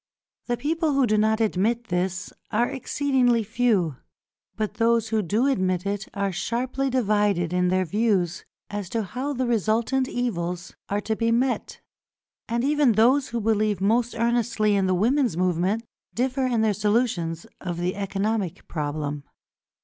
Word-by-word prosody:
The 240 -1 0
people 320 +2 0
who 275 -1 +3
do 215 -2 +2
not 220 +1 +2
admit 225 +3 0
this 185 +1 -2 0.2
are 235 +2 +2
exceedingly 260 -3 +1
few; 210 - +1 0.6
but 215 -1 -2
those 230 -1 +3
who 220 -1 +1
do 210 +7 +1
admit 185 -9 +1
it 200 0 -2
are 200 -1 0
sharply 250 +8 -2
divided 205 -8 +1
in 180 0 +2
their 185 +1 +2
views 195 -3 0 0.3
as 205 -3 -4
to 225 +1 -1
how 255 +9 -3
the 255 -1 -1
resultant 235 +3 +1
evils 180 -7 -3 0.2
are 205 +1 0
to 220 +1 -1
be 230 +1 0
met, 250 +3 0 0.7
and 235 +1 0
even 290 -3 +3
those 255 +6 +4
who 235 - -3
believe 215 -2 +1
most 230 +5 +1
earnestly 230 -2 +1
in 195 -1 +2
the 185 - +2
women's 240 - +2
movement, 185 +5 +1 0.3
differ 260 +2 0
in 235 -3 +1
their 220 -1 +2
solutions 205 -6 0 0.2
of 175 -2 -4
the 175 +1 -1
economic 200 -1 -2
problem. 145 -2 -3
215 Hz, 155 wpm, -25 LUFS, 185-240 Hz, 0.7 s, those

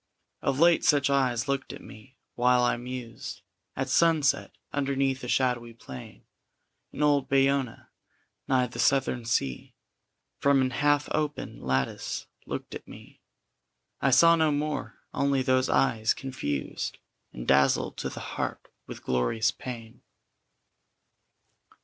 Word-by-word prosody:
Of 135 - 0
late 170 +1 +5
such 140 -2 +3
eyes 130 -3 +1
looked 140 -1 -2
at - - -10
me 120 +6 -14 0.2
while 125 0 +3
I 120 - +3
mused 120 -1 -7 0.3
At 135 0 -2
sunset, 155 0 +3 0.2
underneath 135 -2 0
a - - -4
shadowy 120 -2 0
plane 65 - -11 0.7
In - - -2
old 145 -2 +3
Bayona, 135 -3 +1 0.6
nigh 130 -1 +3
the 120 - -9
Southern 130 -3 +2
Sea 70 - -2 0.6
From 140 -1 +4
an 130 -1 +1
half 145 +1 +2
open 150 -1 -2
lattice 65 0 -2 0.2
looked - - -5
at - - -8
me. - - -14 0.8
I 140 - +3
saw 165 +6 +7
no 160 -2 +2
more 150 +1 -2 0.2
only 140 -1 +1
those 130 0 +2
eyes 110 -4 +2
confused 75 - -4 0.3
And - - -8
dazzled 70 0 +3
to - - -3
the - - -8
heart - - -4 0.2
with - - -9
glorious 65 - +1
pain. 120 -2 -9
130 Hz, 130 wpm, -27 LUFS, 115-140 Hz, 0.8 s, saw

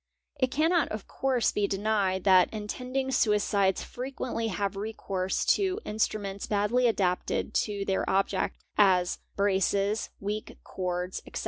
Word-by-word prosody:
It 255 -1 +2
cannot 320 +4 +2
of 215 -2 -6
course 260 -3 +1
be 205 -1 0
denied 195 -2 0
that 185 -2 +5
intending 255 +5 -3
suicides 205 -5 +2
frequently 250 -2 -4
have 200 -1 -2
recourse 195 -2 -2
to 390 -2 0
instruments 205 -2 -2
badly 215 +4 +2
adapted 185 -5 0
to 200 -1 -3
their 190 -1 0
object 195 +1 0 0.2
(as 185 -3 +4 0.2
braces, 200 +1 +1
weak 210 +2 -4
cords, 180 0 -3
etc.) - - -5
205 Hz, 125 wpm, -28 LUFS, 195-230 Hz, 0.2 s, that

